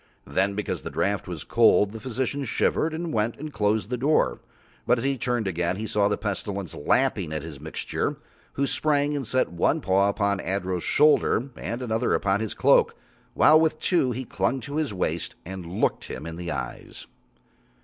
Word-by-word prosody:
Then 95 +8 0
because 105 - -3
the - - -6
draught 100 0 -1
was 85 -5 -5
cold 105 -2 +4
the 110 - -7
physician 130 +3 -2
shivered 155 +5 +1
and 165 +1 -4
went 110 +1 0
and 150 +1 -7
closed 105 +2 0
the 125 - 0
door, 130 - +2 0.5
but 125 - +4
as 115 - -3
he 135 0 +1
turned 120 -2 -1
again 90 -1 -1
he 110 +3 -4
saw 105 -2 +2
the 105 - 0
Pestilence 100 -3 -3
lapping 100 - +1
at 75 -1 -3
his 80 -4 -8
mixing, 80 +2 -3 0.4
who 140 - 0
sprang 145 +1 +1
and 135 -5 -3
set 130 -3 +1
one 85 - +1
paw 100 -5 +2
upon 100 -1 0
Adro's 95 -2 -2
shoulder 140 - +3
and 120 +2 -4
another 110 -2 +1
upon 100 0 +1
his 110 -1 -3
cloak, - - +4 0.4
while 155 +1 +6
with 160 -1 +1
two 170 -8 +2
he 125 +2 -4
clung 110 +5 -1
to 140 +5 -5
his 155 -5 0
waist, 95 +4 -2
and 95 -2 -7
looked 90 - -1
him 75 - -7
in 80 0 -6
the 85 0 -6
eyes. 70 -4 -6
110 Hz, 190 wpm, -25 LUFS, 95-135 Hz, 0.5 s, while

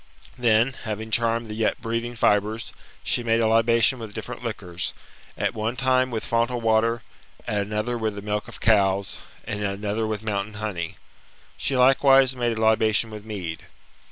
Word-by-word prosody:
*'Then, 120 0 +3
having 110 +1 -4
charmed 115 +1 +2
the 110 - -7
yet 110 0 0
breathing 115 +1 -3
fibres, 105 0 +1 0.3
she - - 0
made 115 -1 +2
a 115 - +2
libation 115 +3 +3
with 110 -3 -8
different 110 +2 -6
liquors, 95 -7 -4 0.4
at - - 0
one 110 +2 -2
time 130 0 +2
with 115 -3 -3
fontal 115 +1 0
water, 115 +1 +2 0.4
at 105 -1 0
another 110 +3 -2
with 110 -2 -1
the 100 - -6
milk 105 0 -2
of - - -10
cows, 100 -3 +2 0.2
and 105 0 -4
at 100 -1 -1
another 105 +2 -2
with 110 -1 -3
mountain 105 -1 -2
honey. 100 -6 -4 0.6
She 135 - -1
likewise 135 0 +5
made 120 -2 -1
a - - -2
libation 110 0 +3
with 105 -1 -9
mead. 90 -7 -6
110 Hz, 170 wpm, -24 LUFS, 105-115 Hz, 0.6 s, likewise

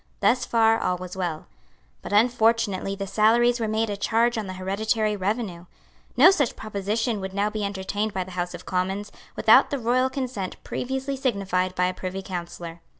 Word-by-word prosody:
Thus 255 - +2
far 225 -1 +3
all 180 - 0
was 180 0 -8
well. 175 -4 -3 0.6
But - - -8
unfortunately 220 -3 +2
the 195 0 -4
salaries 235 +4 +3
were 225 - -1
made 220 +1 0
a 205 - -3
charge 230 +4 +1
on 220 -3 -3
the 185 - -5
hereditary 210 +3 0
revenue. 195 -3 -3 0.5
No 370 - +9
such 285 - 0
proposition 215 +1 -2
would 190 0 -6
now 205 +1 +1
be 215 -1 -3
entertained 200 +2 -2
by 190 -2 -2
the 185 - -12
House 180 0 -3
of 175 - -11
Commons, 190 +3 -2 0.2
without - - +6
the 285 - -1
royal 255 +2 +1
consent 255 -8 -4
previously 265 +2 -3
signified 195 -8 -1
by 180 - +2
a 185 - 0
Privy 185 +1 -5
Councillor. 170 -2 -7
205 Hz, 180 wpm, -25 LUFS, 185-230 Hz, 0.6 s, No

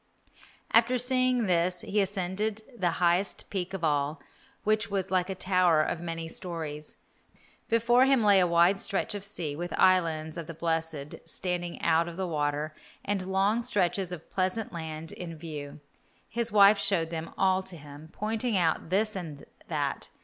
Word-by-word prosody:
After 235 +3 +4
seeing 255 -1 +2
this 180 -1 +1
he 205 +1 0
ascended 200 +3 -2
the 185 -6 +1
highest 175 +2 +1
peak 190 -2 -2
of 180 - -6
all, 145 -1 +1 0.4
which 215 0 +1
was 195 -2 -2
like 185 0 +1
a 190 - -2
tower 180 -4 +3
of 165 - -3
many 165 -1 -4
stories. 160 -4 -5 0.7
Before 240 +3 +4
him 270 -4 +3
lay 200 -2 +6
a 180 - +4
wide 170 +3 +4
stretch 200 0 -1
of 205 -1 -5
sea, 175 -8 -2
with 175 +3 -4
islands 165 -4 +2
of 165 - -7
the 165 - -7
blessed 160 -3 -2
standing 175 -1 -4
out 165 0 +3
of 170 0 -7
the 190 - -1
water, 150 -2 -1 0.3
and 195 -2 -1
long 195 +4 +2
stretches 195 -5 0
of 170 -3 -8
pleasant 190 +3 -1
land 160 -1 -5
in 165 -2 -7
view. 150 -3 -7 0.5
His 235 0 -1
wife 200 0 +7
showed 195 -5 0
them 165 0 -5
all 190 -1 +3
to 190 -2 -8
him, 145 +1 -12
pointing 220 +2 -1
out 165 -2 +1
this 210 +3 +1
and 160 -6 -7 0.2
that. - - -2
180 Hz, 165 wpm, -28 LUFS, 165-205 Hz, 0.7 s, wife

